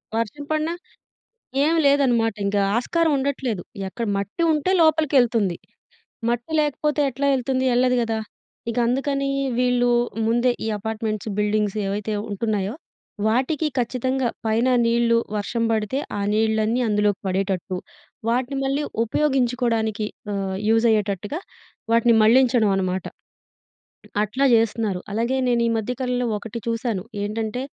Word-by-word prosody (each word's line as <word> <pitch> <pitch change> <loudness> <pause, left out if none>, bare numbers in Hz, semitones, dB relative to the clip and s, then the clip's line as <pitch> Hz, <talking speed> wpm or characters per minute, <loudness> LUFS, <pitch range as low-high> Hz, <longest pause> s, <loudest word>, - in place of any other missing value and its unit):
వర్షం 230 +6 -2
పడిన 310 +1 0 0.9
ఏం 325 +2 +2
లేదన్నమాట 245 -6 +3
ఇంకా 200 0 +1 0.2
ఆస్కారం 325 +6 +1
ఉండట్లేదు 265 -7 -2 0.3
ఎక్కడ 230 +3 -4
మట్టి 200 - -3
ఉంటే 305 +5 0
లోపలికెళ్తుంది. 255 - +3 0.7
మట్టి 240 +6 -2
లేకపోతే 300 0 0
ఎట్లా 275 +3 -2
ఎళ్తుంది? 260 +1 0
ఎల్లాదు 250 +1 +3
కదా! 225 -1 -1 0.5
ఇక 230 - -4
అందుకని 275 +2 0 0.3
వీళ్ళు 245 -1 +2 0.4
ముందే 240 +2 +3
ఈ - - -1
అపార్ట్మెంట్స్, 220 0 -3
బిల్డింగ్స్ 210 0 +1
ఏవైతే 205 +2 -2 0.2
ఉంటున్నాయో 205 -1 -1 0.5
వాటికి 265 +7 +1
ఖచ్చితంగా 255 +1 0 0.2
పైన 225 +3 +2 0.2
నీళ్ళు 230 0 +3 0.2
వర్షం 230 +3 -1
పడితే 220 +5 0 0.2
ఆ - - -2
నీళ్ళన్నీ 220 +2 +1
అందులోకి 210 -1 +1
పడేటట్టు 190 -1 -1 0.5
వాటిని, 255 +3 0
మళ్ళీ 275 +2 0 0.2
ఉపయోగించుకోవడానికి 235 -5 0 0.3
ఆహ్, 190 -1 -2
యూజైయ్యేటట్టుగా 220 - +1 0.5
వాటిని 230 0 +4
మళ్లించడం 240 -1 +4
అనమాట. 185 -1 -1
హ్మ్. - - -15 1.0
అట్లా 255 +7 0
చేస్తున్నారు. 220 -4 +1
అలాగే 235 +4 0
నేను 235 -1 +2
ఈ - - +1
మధ్య 225 +3 -2
కాలంలో 250 -1 -1
ఒకటి 225 +2 -7
చూసాను 230 -4 -1 0.2
ఏంటంటే 220 +4 -3
235 Hz, 120 wpm, -23 LUFS, 215-260 Hz, 1.0 s, వాటిని